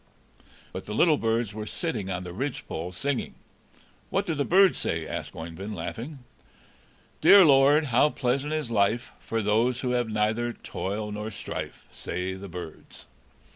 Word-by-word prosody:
But - - -7
the 105 - -4
little 155 +3 +4
birds 115 -2 0
were 105 0 -6
sitting 105 - -3
on 90 -1 -3
the 90 -1 -7
ridgepole, 95 - -4
singing. 135 +8 -2 0.7
"What 195 +1 0
do 165 - -1
the 145 -2 0
birds 190 +5 +5
say?" 80 -1 -2
asked - - -5
Oeyvind, 85 +6 -6
laughing. 125 - -6 1.0
"'Dear 200 -2 +9
Lord, 145 +2 +6
how 130 +3 +4
pleasant 135 +2 -1
is 155 -6 -2
life, 110 +3 +1
For 115 -1 -2
those 115 +5 +2
who 125 - -1
have 120 -2 0
neither 110 +3 0
toil 105 +1 -4
nor 105 +1 -4
strife,' 110 - -6
say 90 +2 -4
the 95 +1 -8
birds." 85 -2 -9
115 Hz, 155 wpm, -27 LUFS, 100-140 Hz, 1.0 s, Dear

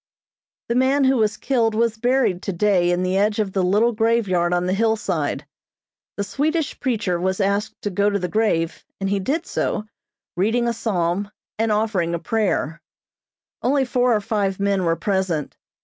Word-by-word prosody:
The 235 - 0
man 265 +3 +3
who 265 0 +3
was 215 -1 +1
killed 230 -5 +1
was 230 0 +1
buried 245 -5 +1
today 190 -2 +1
in 175 +1 +1
the 185 +1 0
edge 205 +1 +2
of 205 -3 -1
the 195 - +1
little 210 +6 +3
graveyard 215 -6 +1
on 175 0 +1
the 185 - 0
hillside. 195 -8 0 0.7
The 200 - 0
Swedish 295 - -1
preacher 210 -9 -1
was 190 +2 -1
asked 200 +2 -1
to 205 - -2
go 200 +2 +2
to 200 - 0
the 180 -2 -2
grave, 170 -5 0 0.2
and 195 - -1
he 200 - +1
did 295 - -1
so, - - -2 0.5
reading 225 +6 +1
a 235 - +1
Psalm, 195 -3 -1 0.3
and 225 0 +1
offering 205 -6 0
a - - 0
prayer. 175 -5 -1 0.8
Only 270 +2 +2
four 250 -1 +2
or 210 - 0
five 200 -3 -1
men 200 -2 +1
were 165 0 +2
present. 190 -6 -1
205 Hz, 175 wpm, -22 LUFS, 185-230 Hz, 0.8 s, man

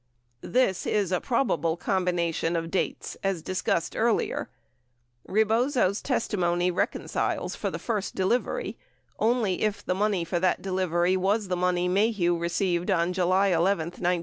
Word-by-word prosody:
This 245 -7 +1
is 200 -4 +1
a 180 - +1
probable 170 - 0
combination 175 -3 0
of 165 0 -2
dates, 190 - -2
as 195 -5 -1
discussed 185 -2 -1
earlier. 230 0 0 0.8
95 - - -10
Rebozo's 220 -1 +2
testimony 180 -8 0
reconciles 180 - -2
for - - -2
the - - -4
first 210 -4 -3
delivery 210 +7 -1 0.4
only 220 -4 +1
if 215 -1 -1
the - - +1
money 195 -2 0
for 175 +1 -1
that 185 +1 +2
delivery 185 -1 +1
was 195 +2 0
the 180 - +1
money 180 0 +1
Maheu 190 -2 +2
received 175 +1 0
on 180 -1 +2
July 185 +2 +2
11, 170 0 +3 0.2
1969. 175 0 -1
185 Hz, 145 wpm, -27 LUFS, 175-210 Hz, 0.8 s, 11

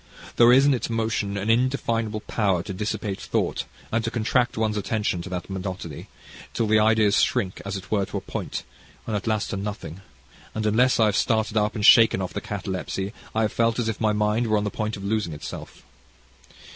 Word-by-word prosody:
There 120 0 +7
is 135 +2 +6
in 145 - +5
its 125 - -2
motion 110 -3 -1
an 100 +3 +1
indefinable 115 -3 0
power 95 -7 0
to 100 - -6
dissipate 105 0 -3
thought, - - -1 0.3
and 115 0 0
to 115 - -1
contract 120 +2 0
one's 110 -1 0
attention 105 -3 -1
to 95 - -8
that 90 -1 -4
monotony, 95 -5 -6 0.5
till 115 - +1
the 110 0 +4
ideas 110 -1 +4
shrink, 95 -2 0
as 100 0 -4
it 95 0 -11
were, 100 -3 +1
to 100 - -4
a - - -4
point, - - -5 0.4
and 110 - -2
at 105 - -3
last 110 -1 0
to - - -2
nothing 95 -4 -6 0.5
and 110 0 -2
unless 120 +4 +3
I 110 - +6
had 105 - +2
started 110 +1 +1
up, 105 +1 +1
and 105 -2 0
shook 115 -1 +8
off 95 -1 -4
the - - -3
catalepsy 95 0 -4 0.2
I 110 - +2
have 110 - -1
felt 115 -1 +1
as 120 -2 -1
if 110 -1 -3
my 110 -1 +3
mind 105 +2 +1
were 110 -1 +2
on 105 - 0
the 105 - -2
point 110 -1 -3
of 100 - -9
losing 100 -5 -1
itself. 75 - -8
105 Hz, 210 wpm, -24 LUFS, 100-115 Hz, 0.5 s, shook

